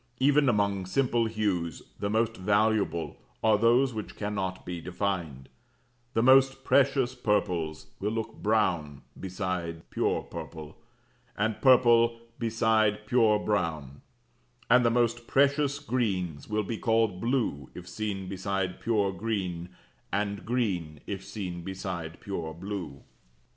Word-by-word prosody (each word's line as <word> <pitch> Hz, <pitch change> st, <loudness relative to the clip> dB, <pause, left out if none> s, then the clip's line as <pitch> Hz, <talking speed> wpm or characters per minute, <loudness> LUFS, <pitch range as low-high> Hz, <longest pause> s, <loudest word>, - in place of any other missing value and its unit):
Even 140 Hz, +1 st, +4 dB
among 100 Hz, -4 st, +1 dB
simple 120 Hz, +1 st, +1 dB
hues 100 Hz, -7 st, -2 dB, 0.2 s
the 100 Hz, -, -1 dB
most 115 Hz, +1 st, +1 dB
valuable 105 Hz, -3 st, +1 dB, 0.3 s
are 110 Hz, -1 st, +5 dB
those 120 Hz, +4 st, +3 dB
which 110 Hz, -2 st, -6 dB
cannot 100 Hz, -3 st, -3 dB
be 90 Hz, -1 st, -5 dB
defined; 85 Hz, -7 st, -3 dB, 0.7 s
the 115 Hz, -, +3 dB
most 135 Hz, +1 st, +5 dB
precious 135 Hz, -2 st, +3 dB
purples 90 Hz, -10 st, -1 dB
will 100 Hz, -, -1 dB
look 115 Hz, 0 st, -3 dB
brown 85 Hz, -10 st, 0 dB, 0.2 s
beside 90 Hz, -3 st, -4 dB
pure -, -, 0 dB
purple, 80 Hz, -1 st, -8 dB, 0.6 s
and 110 Hz, +1 st, -1 dB
purple 120 Hz, -3 st, +5 dB, 0.2 s
beside 110 Hz, -2 st, +2 dB
pure 110 Hz, -2 st, +4 dB
brown; 80 Hz, -10 st, -2 dB, 0.7 s
and 125 Hz, 0 st, +7 dB
the 115 Hz, -, +4 dB
most 120 Hz, 0 st, +1 dB
precious 140 Hz, +1 st, +3 dB
greens 100 Hz, -, -2 dB
will 105 Hz, 0 st, 0 dB
be 110 Hz, +2 st, -4 dB
called 110 Hz, -5 st, +1 dB
blue 115 Hz, -, -1 dB
if 90 Hz, -1 st, -9 dB
seen 95 Hz, 0 st, -4 dB
beside 95 Hz, 0 st, -2 dB
pure 105 Hz, -4 st, +1 dB
green, 95 Hz, -4 st, -3 dB, 0.4 s
and 100 Hz, +1 st, -2 dB
green 95 Hz, -, -1 dB
if 100 Hz, -2 st, -5 dB
seen 95 Hz, -3 st, -5 dB
beside 90 Hz, -3 st, -5 dB
pure 80 Hz, -5 st, -5 dB
blue. 85 Hz, -6 st, -6 dB
105 Hz, 125 wpm, -28 LUFS, 90-115 Hz, 0.7 s, and